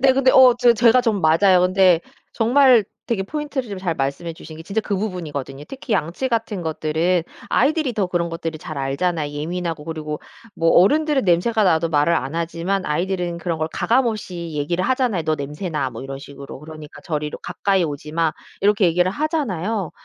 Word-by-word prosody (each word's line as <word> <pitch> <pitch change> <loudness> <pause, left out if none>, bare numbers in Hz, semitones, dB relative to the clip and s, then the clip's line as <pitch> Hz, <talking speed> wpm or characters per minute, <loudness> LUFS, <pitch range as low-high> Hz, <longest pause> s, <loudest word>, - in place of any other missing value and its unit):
네 265 0 +5
근데 260 0 +3
어 255 -2 +7
저 245 -1 +6
제가 235 +2 +5
좀 220 -5 0
맞아요. 180 +3 +4
근데 185 -2 +4 0.3
정말 245 -1 +4 0.2
되게 215 -5 -1
포인트를 290 +1 -4
좀 200 -2 -5
잘 180 -3 -2
말씀해 140 +5 -3
주신 160 -1 -11
게 160 - -9
진짜 200 +6 -2
그 205 -2 -2
부분이거든요. 150 -9 -5
특히 270 -3 -6
양치 180 - -1
같은 225 -5 -2
것들은 160 +2 0 0.3
아이들이 295 +1 +1
더 205 -3 0
그런 175 -1 -1
것들을 165 -1 -5
잘 155 - -8
알잖아요. 145 +2 -1
예민하고 165 +1 -4
그리고 155 -2 -5 0.3
뭐 165 0 +2
어른들은 290 - +4
냄새가 205 +6 +2
나도 165 -2 +2
말을 155 +2 +2
안 135 0 -2
하지만 170 +3 -2
아이들은 175 +2 -1
그런 170 -2 -3
걸 155 - -1
가감 250 +2 +2
없이 180 -7 -4
얘기를 170 +5 -1
하잖아요. 250 -9 +1
"너 155 0 0
냄새나." 150 -1 -3
뭐 115 0 -8
이런 135 0 -6
식으로. 140 -1 -10
그러니까 155 -1 -11
저리로 150 -2 -3
"가까이 195 -2 0
오지마." 155 +2 -2 0.3
이렇게 205 -1 +4
얘기를 180 +2 +2
하잖아요. 220 - -2
175 Hz, 405 characters per minute, -21 LUFS, 155-220 Hz, 0.3 s, 어